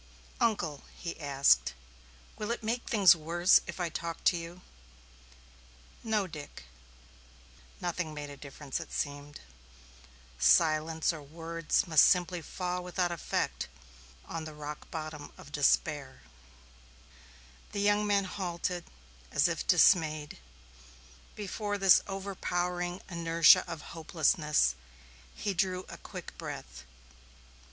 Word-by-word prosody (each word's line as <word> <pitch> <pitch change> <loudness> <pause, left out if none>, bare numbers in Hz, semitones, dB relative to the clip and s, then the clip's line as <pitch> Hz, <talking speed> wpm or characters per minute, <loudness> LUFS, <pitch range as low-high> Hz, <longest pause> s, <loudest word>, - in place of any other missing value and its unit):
"Uncle," 170 -11 0 0.2
he 170 -2 -6
asked, 140 - +3 0.6
"will 210 - -5
it 235 -1 -3
make 235 +3 -2
things 195 -5 +7
worse 170 +3 +4
if - - -7
I 175 -1 -1
talk 165 +1 -5
to - - +4
you?" 170 +1 -7 1.4
"No, 215 -3 +1
Dick." 150 - -9 1.2
Nothing 175 -2 -2
made 145 -1 -7
a - - -8
difference, 140 -1 -6
it - - -9
seemed. 145 0 -4 1.0
Silence 155 - +3
or 160 - -8
words 165 +2 -1
must 155 -3 +6
simply 180 -1 +3
fall 180 +2 -4
without 180 0 -1
effect 170 - -2 0.6
on 165 -1 -5
the 155 -1 -8
rock 150 0 -8
bottom 155 -2 -6
of 145 - -13
despair. 145 -1 +1 1.5
The 205 - -3
young 205 +1 +3
man 200 -1 +3
halted, 180 -2 -3 0.5
as - - +3
if - - -3
dismayed, 155 - +3 1.0
before 205 0 -3
this 195 -2 +6
overpowering 180 -2 -3
inertia 170 +1 +5
of 165 -2 -6
hopelessness; 155 - +2 0.6
he 200 - -2
drew 185 0 0
a - - -9
quick - - -9
breath. - - -8
170 Hz, 115 wpm, -30 LUFS, 150-185 Hz, 1.5 s, things